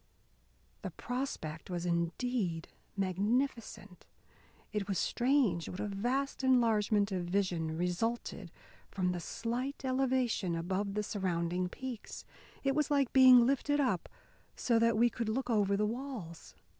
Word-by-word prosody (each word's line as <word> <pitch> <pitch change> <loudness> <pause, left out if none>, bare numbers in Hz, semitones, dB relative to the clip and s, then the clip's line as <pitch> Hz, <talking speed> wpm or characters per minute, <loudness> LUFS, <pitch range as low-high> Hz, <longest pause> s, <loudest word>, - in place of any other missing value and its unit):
The - - -4
prospect 245 - -5
was 175 -1 -3
indeed 170 +1 -1 0.3
magnificent; 205 +1 -2 0.7
it 210 -2 -2
was 195 -3 -1
strange 245 - +1
what 180 - -7
a - - -1
vast 245 +8 -2
enlargement 220 -5 +3
of 180 -2 -2
vision 175 -4 -1
resulted 180 +2 -2 0.4
from 185 -2 0
the 180 - -3
slight 245 - -4
elevation 255 -8 +1
above 190 +4 -2
the 210 - 0
surrounding 180 -3 -1
peaks. 255 +1 -7 0.4
It 275 0 +2
was 300 0 +1
like 280 -4 +1
being 255 -2 +8
lifted 280 +3 +1
up 250 - 0 0.5
so 235 -2 +2
that 230 -1 +3
we 240 +1 +4
could 230 -2 -3
look 250 +2 -1
over 200 -2 +2
the 210 - +2
walls. 225 -8 -6
210 Hz, 130 wpm, -32 LUFS, 180-255 Hz, 0.7 s, being